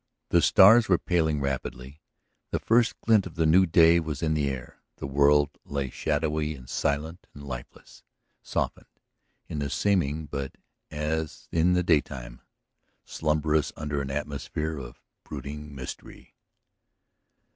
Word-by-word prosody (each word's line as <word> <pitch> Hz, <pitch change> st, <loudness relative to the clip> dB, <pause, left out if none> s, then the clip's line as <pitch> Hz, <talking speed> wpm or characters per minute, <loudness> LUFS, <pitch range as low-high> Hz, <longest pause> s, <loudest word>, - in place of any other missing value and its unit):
The 85 Hz, -, +4 dB
stars 110 Hz, +5 st, +7 dB
were 90 Hz, -, +5 dB
paling 80 Hz, -5 st, 0 dB
rapidly; 70 Hz, +1 st, -4 dB, 0.5 s
the -, -, -1 dB
first 115 Hz, +1 st, +2 dB
glint 110 Hz, -4 st, +3 dB
of 80 Hz, -, -13 dB
the 80 Hz, -1 st, +1 dB
new 90 Hz, +4 st, +5 dB
day 85 Hz, +1 st, +6 dB
was 75 Hz, -3 st, -4 dB
in 80 Hz, -1 st, +1 dB
the 75 Hz, -2 st, 0 dB
air, 65 Hz, -2 st, -7 dB
the -, -, -7 dB
world 70 Hz, +1 st, +3 dB
lay 70 Hz, -3 st, -3 dB
shadowy 75 Hz, 0 st, -1 dB
and 65 Hz, -2 st, -13 dB
silent 75 Hz, +7 st, -2 dB
and 70 Hz, -, -10 dB
lifeless, 60 Hz, -2 st, -9 dB, 0.4 s
softened -, -, -3 dB, 0.6 s
in 75 Hz, -, -4 dB
the 70 Hz, -1 st, -2 dB
seeming, 80 Hz, -5 st, 0 dB
but, 70 Hz, -2 st, -5 dB, 0.3 s
as 75 Hz, +1 st, -3 dB
in 85 Hz, +2 st, +3 dB
the 90 Hz, 0 st, +2 dB
daytime, 65 Hz, -7 st, -1 dB, 0.6 s
slumbrous 75 Hz, -1 st, 0 dB
under 75 Hz, -1 st, -3 dB
an 70 Hz, -, -5 dB
atmosphere 75 Hz, +2 st, -4 dB
of -, -, -11 dB, 0.2 s
brooding 75 Hz, +1 st, -8 dB
mystery. 65 Hz, -1 st, -9 dB
75 Hz, 135 wpm, -27 LUFS, 70-80 Hz, 0.6 s, stars